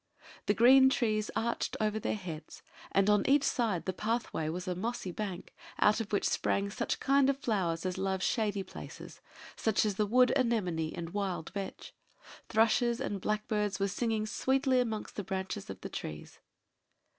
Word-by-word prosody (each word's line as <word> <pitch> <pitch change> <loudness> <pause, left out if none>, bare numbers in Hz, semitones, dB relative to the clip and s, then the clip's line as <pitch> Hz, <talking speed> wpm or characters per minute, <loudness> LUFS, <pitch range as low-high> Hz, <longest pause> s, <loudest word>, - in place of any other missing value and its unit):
The 205 - +3
green 265 +4 +7
trees 215 -5 0
arched 235 +1 -1
over 215 0 0
their - - -1
heads; 170 -6 -8 0.3
and 195 0 +3
on 210 -1 +4
each 285 0 +5
side 215 - 0
the 185 - -1
pathway 215 -6 -2
was 180 +3 -4
a 180 - 0
mossy 210 +1 -3
bank, 190 -1 -5 0.2
out 210 +2 +4
of 220 - -6
which 205 - +1
sprang 200 0 0
such 235 +2 -2
kind 275 0 +3
of 275 - +1
flowers 190 -10 -1
as 185 0 -2
love 190 -1 -1
shady 210 -4 0
places - - -10 0.3
such 220 -1 +1
as 205 -2 -1
the 210 - +1
wood 250 +4 +5
anemone 185 - 0
and 170 -1 -5
wild 195 -5 -2
vetch: 200 -2 -6 0.6
thrushes 230 +2 +3
and 200 -2 -3
blackbirds 210 -1 -1
were 195 - +2
singing 220 +2 -1
sweetly 265 +3 +1
amongst 220 -4 -3
the 205 - -2
branches 190 - -4
of - - -7
the - - -6
trees. 75 -1 -7
210 Hz, 170 wpm, -31 LUFS, 190-235 Hz, 0.6 s, green